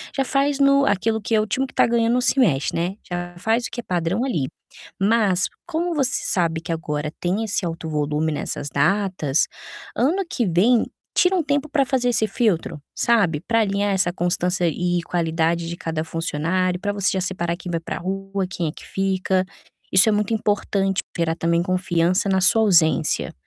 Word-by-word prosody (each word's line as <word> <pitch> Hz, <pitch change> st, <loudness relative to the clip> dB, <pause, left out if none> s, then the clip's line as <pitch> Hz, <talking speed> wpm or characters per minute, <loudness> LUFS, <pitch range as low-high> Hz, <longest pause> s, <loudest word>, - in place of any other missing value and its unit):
já 270 Hz, -, +1 dB
faz 280 Hz, +1 st, 0 dB
no 275 Hz, 0 st, +4 dB
aquilo 220 Hz, +2 st, +1 dB
que 220 Hz, +2 st, -4 dB
é 215 Hz, -, +4 dB
o 215 Hz, -, -3 dB
time 260 Hz, +6 st, 0 dB
que -, -, -13 dB
está -, -, +3 dB
ganhando 230 Hz, 0 st, +2 dB
não 250 Hz, -, +2 dB
se 270 Hz, -, +2 dB
mexe, 150 Hz, -, +2 dB
né, 175 Hz, +4 st, -1 dB
já 175 Hz, 0 st, -5 dB
faz 225 Hz, +4 st, +1 dB
o -, -, -6 dB
que 240 Hz, -, -6 dB
é -, -, -5 dB
padrão 180 Hz, +5 st, -1 dB
ali. 160 Hz, -, -1 dB, 0.5 s
Mas, 200 Hz, -4 st, +2 dB, 0.2 s
como 345 Hz, 0 st, -2 dB
você 265 Hz, -3 st, +1 dB
sabe 165 Hz, -3 st, 0 dB
que 165 Hz, -, -6 dB
agora 150 Hz, -2 st, -3 dB
tem 190 Hz, +5 st, -1 dB
esse 205 Hz, -3 st, -1 dB
alto 165 Hz, -1 st, -5 dB
volume 150 Hz, +1 st, -1 dB
nessas 145 Hz, -1 st, -4 dB
datas, 160 Hz, -1 st, +1 dB, 0.5 s
ano 345 Hz, +10 st, +1 dB
que 240 Hz, -, -1 dB
vem, 210 Hz, +7 st, +3 dB, 0.3 s
tira 360 Hz, +1 st, +4 dB
um 355 Hz, -, +2 dB
tempo 285 Hz, +1 st, -1 dB
para 280 Hz, -2 st, +2 dB
fazer 250 Hz, -2 st, 0 dB
esse 220 Hz, -2 st, +1 dB
filtro, 195 Hz, -8 st, 0 dB, 0.2 s
sabe, 200 Hz, -10 st, +2 dB
para 230 Hz, 0 st, +3 dB
alinhar 200 Hz, -1 st, 0 dB
essa 190 Hz, -2 st, +1 dB
constância 180 Hz, 0 st, 0 dB
e 175 Hz, +2 st, 0 dB
qualidade 165 Hz, 0 st, -1 dB
de 170 Hz, -, -5 dB
cada 160 Hz, -1 st, -3 dB
funcionário, 165 Hz, +3 st, -1 dB
para 205 Hz, +1 st, -2 dB
você 200 Hz, -1 st, 0 dB
já 190 Hz, -, -1 dB
separar 170 Hz, -2 st, -2 dB
quem 175 Hz, 0 st, -7 dB
vai 165 Hz, -, -1 dB
para 165 Hz, -, -5 dB
rua, 195 Hz, +1 st, -3 dB
quem 175 Hz, -4 st, -3 dB
é 150 Hz, -, -2 dB
que -, -, -13 dB
fica. 190 Hz, -1 st, 0 dB, 0.5 s
Isso 190 Hz, +4 st, +7 dB
é -, -, +3 dB
muito 210 Hz, +1 st, 0 dB
importante 200 Hz, -3 st, 0 dB
pra 170 Hz, -, -3 dB
gerar 165 Hz, 0 st, 0 dB
também 170 Hz, +1 st, +1 dB
confiança 185 Hz, 0 st, +1 dB
na 190 Hz, -1 st, +2 dB
sua 225 Hz, +4 st, +5 dB
ausência, 165 Hz, -5 st, +3 dB
190 Hz, 195 wpm, -22 LUFS, 170-225 Hz, 0.5 s, Isso